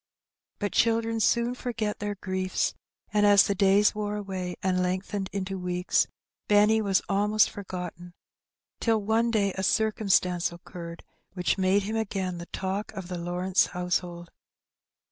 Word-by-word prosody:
But 205 -1 -2
children 225 0 +2
soon 235 +2 +2
forget 225 -4 -3
their 205 0 -3
griefs, 185 -1 -1 0.4
and 210 -1 +3
as 205 -1 +7
the 200 - +1
days 200 +1 +4
wore 210 0 -3
away, 190 -3 -4
and 185 -1 +1
lengthened 190 +2 -2
into 195 -1 -3
weeks, 180 0 +1 0.4
Benny 210 +2 +5
was 195 -3 +1
almost 210 +2 +3
forgotten, 180 -3 -7 0.6
till 225 -2 +2
one 225 +3 +2
day 200 -4 +1
a 190 - -2
circumstance 195 -4 +2
occurred 170 -1 -9 0.3
which 180 +1 0
made 190 +2 +3
him 215 +3 -2
again 190 -5 -2
the 170 - -8
talk 195 +2 -3
of 185 -2 -7
the 180 - -4
Lawrence 180 +2 +1
household. 175 -1 -2
195 Hz, 145 wpm, -27 LUFS, 180-210 Hz, 0.6 s, as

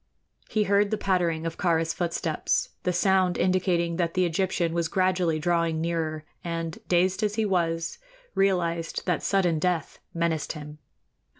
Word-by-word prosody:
He 215 - +2
heard 200 0 +3
the 215 - 0
pattering 175 -5 0
of 165 - -4
Kāra's 165 -2 +1
footsteps, 170 -3 -1
the 180 - 0
sound 185 0 +2
indicating 175 -2 +1
that 170 -2 -1
the 185 -1 +3
Egyptian 175 -1 0
was 170 -1 0
gradually 185 -3 +1
drawing 165 0 +1
nearer, 160 -2 -2 0.2
and, 165 -1 -4
dazed 185 +3 +2
as 210 -1 0
he 220 -1 +1
was, 165 - 0 0.3
realized 170 -4 0
that 180 -3 0
sudden 180 -5 +2
death 175 -2 -1
menaced 165 -2 -1
him. 150 -1 -9
170 Hz, 145 wpm, -26 LUFS, 165-185 Hz, 0.3 s, heard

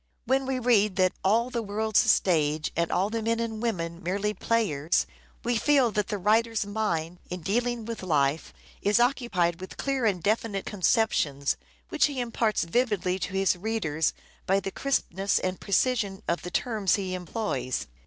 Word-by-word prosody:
When 265 0 +1
we 265 -1 0
read 215 -5 +3
that 185 -1 +3
" - - -36
all 230 +6 +2
the 235 -2 -1
world's 215 0 +1
a - - -4
stage 155 -4 +2
and 170 0 0
all 195 +4 +1
the 230 0 -1
men 230 +1 0
and 225 -2 -3
women 170 -7 -2
merely 200 +3 -1
players," 185 -8 +1 0.4
we 240 0 +1
feel 275 -4 +3
that 210 -1 -1
the 210 - -2
writer's 220 +2 +2
mind, 180 -5 -2
in 180 0 -5
dealing 235 +5 -1
with 230 0 -5
life, 150 -4 +1 0.3
is 205 +3 +3
occupied 220 -9 +1
with 185 - -9
clear 270 -4 0
and 185 -5 -1
definite 210 -2 0
conceptions, 170 -8 +1 0.3
which 310 - +3
he 280 -3 -4
imparts 230 -2 0
vividly 190 -1 0
to 190 - -4
his 195 -1 +2
readers 175 -6 -1 0.3
by 195 +1 +3
the 195 0 -5
crispness 195 -8 0
and 185 0 -2
precision 200 -1 0
of 170 - 0
the 180 - -6
terms 215 -2 +1
he 190 -2 -3
employs. 180 - -3
205 Hz, 175 wpm, -27 LUFS, 180-230 Hz, 0.4 s, read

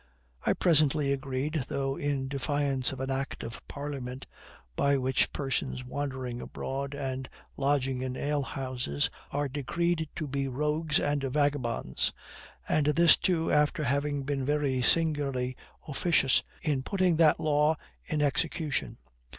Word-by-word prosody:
I - - +3
presently 150 -4 +3
agreed, 135 +1 -2
though 135 -1 -1
in 140 -2 -1
defiance 140 -1 0
of 135 - -7
an 135 0 -2
act 135 +1 -3
of 115 - -7
parliament, 135 -3 -5 0.5
by 140 0 +3
which 130 -1 +2
persons 135 -2 -2
wandering 130 -2 -4
abroad 140 +1 -4
and 130 -2 -3 0.3
lodging 135 -2 +1
in 130 0 -3
ale 145 0 0
houses 130 - -2 0.2
are 145 0 -1
decreed 160 +4 -1
to 155 - -3
be 140 -1 -1
rogues 150 +3 +1
and 145 -1 0
vagabonds; 135 - 0 0.6
and 150 -1 +2
this 165 +2 +6
too 165 -3 +1
after 150 +2 +3
having 140 +1 0
been 135 -1 -1
very 140 -2 +1
singularly 140 -4 +1 0.3
officious 145 -2 +3 0.2
in 145 -4 +1
putting 185 +2 +1
that 160 -2 +5
law 150 +1 +3 0.3
in 150 -1 0
execution. 150 +1 -1
140 Hz, 135 wpm, -29 LUFS, 130-150 Hz, 0.6 s, this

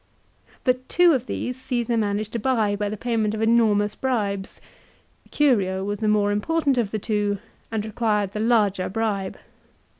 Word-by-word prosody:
But 255 0 0
two 350 -1 +5
of 260 -2 -1
these 250 +1 -4
Caesar 240 -2 -1
managed 210 -1 -1
to 235 - -1
buy 220 -4 +1
by 205 0 -2
the 215 - -5
payment 220 -2 0
of 220 - -4
enormous 220 -3 +3
bribes. 205 -7 -2 0.7
Curio 195 -10 +2
was 205 +1 -3
the 220 - 0
more 210 -1 +3
im 205 0 0
portant 295 -2 +1
of 225 -4 0
the 215 - -2
two 205 -1 -1 0.3
and 215 -2 -2
required 210 -3 0
the 210 - -5
larger 210 -5 +2
bribe. 200 -2 -2
215 Hz, 170 wpm, -24 LUFS, 205-240 Hz, 0.7 s, two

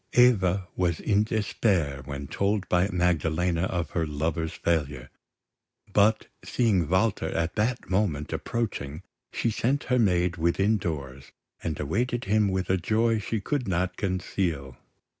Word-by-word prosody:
Eva 100 -7 +4
was 85 -3 0
in 105 -1 +2
despair 100 - 0
when 70 0 -5
told 100 +7 -1
by 90 +1 +3
Magdalena 90 -1 +1
of 85 -4 -2
her 80 -2 -1
lover's 80 +2 -2
failure; 75 -4 -1 0.8
but, 105 +2 +4 0.2
seeing 100 -10 +1
Walter 95 +3 +1
at 80 0 -1
that 110 +3 -1
moment 95 -7 0
approaching, 95 -9 -3 0.3
she 115 - 0
sent 130 +6 0
her 125 - +4
maid 90 -5 +2
within 95 +6 +2
doors, 70 -6 -5 0.3
and 80 -3 -3
awaited 120 - -1
him 105 +1 +3
with 95 -1 -1
a 95 - +3
joy 110 +5 +1
she 110 +1 -2
could 135 +3 -2
not 90 0 0
conceal. 90 -8 -2
90 Hz, 140 wpm, -27 LUFS, 80-105 Hz, 0.8 s, Eva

